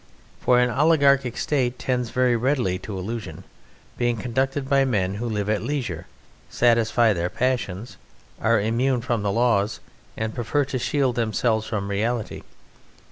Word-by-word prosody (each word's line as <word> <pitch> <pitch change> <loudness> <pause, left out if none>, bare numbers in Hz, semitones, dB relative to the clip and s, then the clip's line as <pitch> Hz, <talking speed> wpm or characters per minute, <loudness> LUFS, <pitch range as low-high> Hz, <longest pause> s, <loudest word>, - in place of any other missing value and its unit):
For 125 -1 +3
an 125 0 +2
oligarchic 140 -3 +3
State 125 -4 0
tends 125 -2 -1
very 125 -1 +2
readily 120 -7 0
to 100 0 -6
illusion, 110 +5 -6 0.6
being 120 -1 +1
conducted 135 +4 -1
by 140 0 +3
men 100 -8 0
who 120 - -2
live 105 -2 -2
at 105 0 0
leisure, 120 - -3 0.4
satisfy 115 -1 +3
their 85 -1 -2
passions, 120 -4 -2 0.4
are 115 0 +3
immune 120 +4 +1
from 120 -2 -1
the 100 -1 0
laws, 115 -2 +1 0.4
and 110 0 -3
prefer 135 +4 0
to 130 -1 -3
shield 135 0 +1
themselves 110 -1 0
from 105 -3 -3
reality. 110 +3 -2
120 Hz, 145 wpm, -23 LUFS, 110-130 Hz, 0.6 s, For